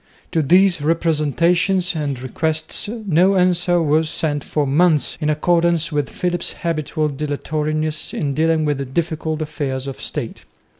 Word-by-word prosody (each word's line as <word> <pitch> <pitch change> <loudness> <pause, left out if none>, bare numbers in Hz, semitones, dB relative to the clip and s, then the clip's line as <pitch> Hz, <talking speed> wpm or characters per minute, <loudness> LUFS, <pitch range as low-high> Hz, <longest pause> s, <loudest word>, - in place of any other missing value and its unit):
To 160 - +2
these 180 +3 +4
representations 170 +4 +1
and 145 -4 -2
requests 155 - -2
no 195 -4 +2
answer 175 -1 +2
was 155 +1 +2
sent 145 -3 -2
for 150 -2 -1
months 155 +2 +2
in 150 - 0
accordance 170 +1 +1
with 145 -2 -1
Philip's 175 -1 -2
habitual 155 -2 -1
dilatoriness 150 +2 -2
in 140 -2 -2
dealing 160 +1 +1
with 140 -3 -3
difficult 160 -2 -1
affairs 140 -4 -4
of 135 -1 -7
State. - - -5
155 Hz, 135 wpm, -20 LUFS, 150-170 Hz, -, these